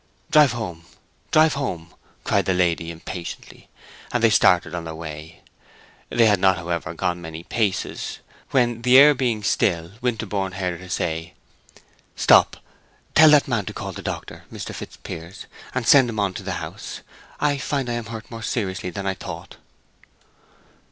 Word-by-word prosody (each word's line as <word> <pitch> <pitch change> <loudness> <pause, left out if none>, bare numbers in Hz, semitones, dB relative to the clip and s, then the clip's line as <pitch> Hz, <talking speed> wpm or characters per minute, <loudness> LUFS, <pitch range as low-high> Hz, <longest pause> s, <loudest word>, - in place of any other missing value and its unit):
"Drive 150 -4 +6
home—drive 115 - -1
home!" 85 -12 -4 0.3
cried 100 -2 +1
the 95 - +1
lady, 85 -2 +1
impatiently; 85 +1 -8 0.4
and - - -1
they - - +6
started 85 -2 +4
on 85 -1 -4
their 80 -1 -6
way. 80 0 -9 0.7
They 120 -1 +4
had 105 -3 +4
not, 95 -1 +4
however, 85 -1 -4
gone 90 0 -1
many 80 0 -8
paces 105 0 -2 0.3
when, 120 -3 +1
the 125 +2 +6
air 145 +2 +9
being 120 -5 -1
still, 85 -3 +1
Winterborne 105 -6 -2
heard 90 -2 -3
her 95 - -11
say 80 -2 -3 0.8
"Stop; - - +5 0.6
tell 155 0 +8
that 150 -2 +5
man 115 -7 -1
to - - -6
call - - -5
the - - -8
doctor—Mr. - - -7
Fitzpiers—and 100 +8 -8
send 130 0 +6
him 110 -2 -4
on 100 -2 0
to - - -6
the 95 0 -4
House. 85 -2 -7 0.4
I 145 -1 +1
find 135 0 -2
I 120 - -2
am 120 -1 -3
hurt 115 0 -8
more 115 -1 -7
seriously 95 -5 -2
than 100 +2 -6
I 95 - 0
thought." - - -9
95 Hz, 155 wpm, -23 LUFS, 85-120 Hz, 0.8 s, air